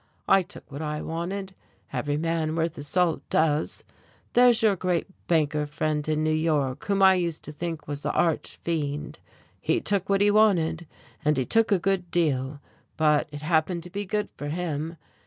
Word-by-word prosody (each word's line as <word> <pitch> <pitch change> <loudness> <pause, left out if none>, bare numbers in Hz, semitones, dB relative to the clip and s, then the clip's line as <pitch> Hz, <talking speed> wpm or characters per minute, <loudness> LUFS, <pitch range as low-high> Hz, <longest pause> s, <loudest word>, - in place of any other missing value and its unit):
I 195 - +6
took 170 - -12
what 140 +2 -6
I 150 -1 -3
wanted, 190 +4 -4 0.4
every 145 +3 -1
man 160 0 -1
worth 165 0 -1
his 145 0 -6
salt 180 0 +1
does. 155 -1 +1 0.5
There's 245 -2 +5
your 210 -3 +5
great 180 -2 0 0.2
banker 150 -2 +1
friend 150 0 -1
in 155 0 +1
New 155 0 +2
York 150 -5 0
whom 200 -1 +2
I 190 0 +8
used 170 -3 -1
to - - -4
think 165 +1 -5
was 145 0 -4
the - - -1
arch 165 -3 0
fiend. 150 -3 -3 0.4
He - - +1
took 200 -2 0
what 195 0 +3
he 205 0 +5
wanted, 175 -6 +3 0.4
and 150 -1 +2
he 130 - +1
took 225 - +2
a 200 - +5
good 180 -1 -1
deal, 145 -5 0 0.4
but 150 -1 +3
it 145 0 -8
happened 165 +2 +1
to 180 - -9
be 200 +1 -4
good 210 +1 -1
for 145 - -5
him. 160 0 -3
165 Hz, 185 wpm, -26 LUFS, 150-185 Hz, 0.5 s, I